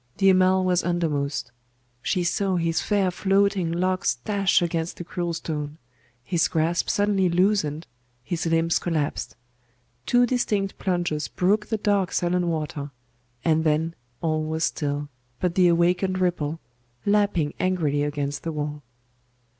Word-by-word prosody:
The 195 -1 +5
Amal 185 0 +4
was 180 -1 +2
undermost.... 150 -7 -1 0.5
She 180 +5 0
saw 190 +2 0
his 165 -1 0
fair 200 -3 +1
floating 195 -1 +1
locks 185 -1 +1
dash 200 -2 +3
against 170 -1 -2
the - - -5
cruel 175 0 -3
stone. 150 -2 -4 0.5
His 170 +1 +1
grasp 165 +1 0
suddenly 200 -2 +2
loosened, 170 -4 +1 0.4
his 170 +4 -2
limbs 165 0 +2
collapsed; 155 -4 -2 0.7
two 245 0 +5
distinct 210 -5 -1
plunges 175 -5 -1
broke 210 +4 +1
the 220 - -1
dark 200 -3 +1
sullen 175 0 +1
water; 150 -3 -3 0.6
and 160 -1 +3
then 160 +1 +1 0.3
all 155 -1 0
was 160 +1 -2
still 145 -3 -1 0.3
but 180 -2 0
the 180 0 +4
awakened 180 +2 +2
ripple, 165 -4 -1 0.5
lapping 200 -7 +2
angrily 165 -6 +1
against 145 -1 -2
the 165 - -3
wall. 150 -1 -4
175 Hz, 135 wpm, -25 LUFS, 155-185 Hz, 0.7 s, The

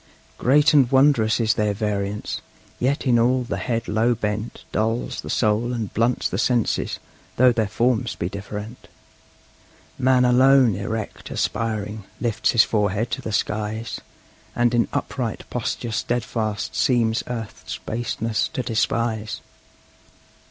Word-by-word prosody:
Great 145 +5 +4
and 135 -5 +5
wondrous 130 -5 +4
is 110 -1 +3
their 105 -1 0
variance! 105 -1 -2 0.4
Yet 135 +4 0
in 120 -3 +4
all 125 +2 +3
the 110 -5 -3
head 115 +4 -2
low 115 +3 +2
bent 105 0 -4
Dulls 115 +2 -1
the - - -8
soul 115 +2 +1
and 115 -5 -4
blunts 115 +3 +1
the - - -3
senses, 120 -3 +1 0.4
though 125 +1 +6
their 110 -3 0
forms 115 +1 0
be 85 - -2
different. 105 +4 -7 1.1
Man 130 -1 +4
alone, 130 -1 +5
erect, 105 +3 -5
aspiring, 110 -2 -2 0.2
lifts 120 -3 0
his 115 - +7
forehead 105 +2 0
to - - -2
the 110 - -5
skies, 110 +2 -2 0.5
And 120 0 +2
in 120 -1 +3
upright 130 -5 -3
posture 120 -1 -3
steadfast 110 -1 -2
seems 115 -3 +2
earth's 115 -3 -6
baseness 115 -1 -2
to 130 - -2
despise. 110 -1 -1
115 Hz, 130 wpm, -23 LUFS, 105-125 Hz, 1.1 s, his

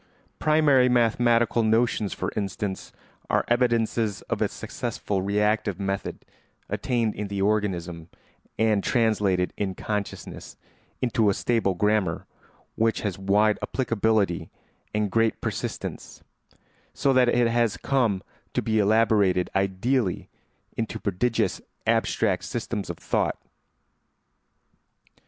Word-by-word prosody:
Primary 150 -5 +4
mathematical 120 -1 +3
notions, 110 -2 +1
for - - -3
instance, 100 -1 -3 0.4
are - - +2
evidences 115 -3 +1
of - - -3
a - - +3
successful 100 -2 -4
reactive 105 0 0
method 100 0 -3 0.4
attained 115 -4 0
in 105 - -4
the 100 0 -4
organism 90 -5 -1 0.5
and 110 -2 +2
translated 105 -6 +1
in 95 -2 -2
consciousness 105 -2 -5 0.5
into 115 -4 +2
a 100 - +1
stable 115 -6 +1
grammar 105 -3 +1 0.5
which 115 0 +1
has 100 -3 -3
wide 105 +2 +3
applicability 110 -7 0 0.4
and 105 -2 -1
great 115 -1 +2
persistence, - - -5 0.7
so 135 -1 +2
that 125 -1 +4
it 120 0 +3
has 115 -2 +1
come 120 -9 +1 0.3
to - - +1
be 110 -1 +1
elaborated 105 -3 +3
ideally 95 +3 0 0.5
into 115 -1 -3
prodigious 110 +4 0 0.2
abstract - - +1
systems - - -4
of - - -4
thought. - - -1
110 Hz, 110 wpm, -25 LUFS, 100-115 Hz, 0.7 s, Primary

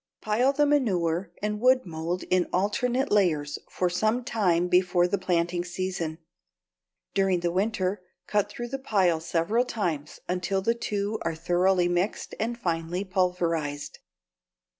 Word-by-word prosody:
Pile 230 +5 +2
the 295 +1 +2
manure 185 - +1
and 210 0 -1
wood 255 +2 +4
mold 170 +1 -3
in 180 -1 +3
alternate 250 +8 0
layers 160 -8 +2
for 180 - 0
some 215 +7 +1
time 180 -8 +1
before 180 0 +3
the 200 +2 -1
planting 175 -1 0
season. 175 -3 -3 1.0
During 190 -3 +2
the 175 0 0
winter 190 0 0 0.2
cut 205 -1 +1
through 240 +3 -6
the 270 +2 -4
pile 190 -10 +2
several 170 +8 +1
times 170 - -3
until 180 +2 -1
the 230 - +3
two 210 -2 -2
are 165 - -2
thoroughly 175 +2 +2
mixed 175 +4 -1
and 235 +2 -1
finely 170 -2 -2
pulverized. 170 -6 -1
185 Hz, 140 wpm, -27 LUFS, 175-215 Hz, 1.0 s, wood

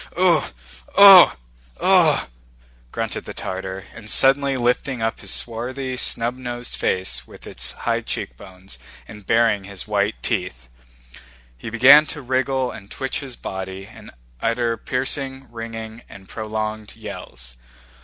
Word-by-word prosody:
"Ooh, 175 -4 +4 0.6
ooh, 195 -3 +10 0.5
ooh!" - - +6 0.7
grunted - - -4
the - - -8
Tartar, 95 0 -6
and 110 -2 -10
suddenly 135 +2 +4
lifting 125 +1 0
up 115 0 -2
his - - -3
swarthy 130 +3 -3
snub 120 0 0
nosed 120 -1 -5
face 60 -10 -1
with - - -15
its - - -2
high - - -1
cheekbones, 90 +1 -7 0.3
and 105 -2 -13
baring 115 -4 +2
his 100 0 -7
white 105 0 0
teeth, 60 - -3 0.9
he 60 - -8
began 135 +7 +7
to 150 -2 -6
wriggle 130 0 0
and 100 -1 -11
twitch 135 +5 -4
his 135 -3 -7
body 95 -1 -7
and - - -14 0.3
utter 115 0 0
piercing, 135 +3 -4
ringing, 115 0 -7
and 95 -1 -13
prolonged 110 0 -5
yells. 65 - -10
115 Hz, 130 wpm, -21 LUFS, 95-130 Hz, 0.9 s, ooh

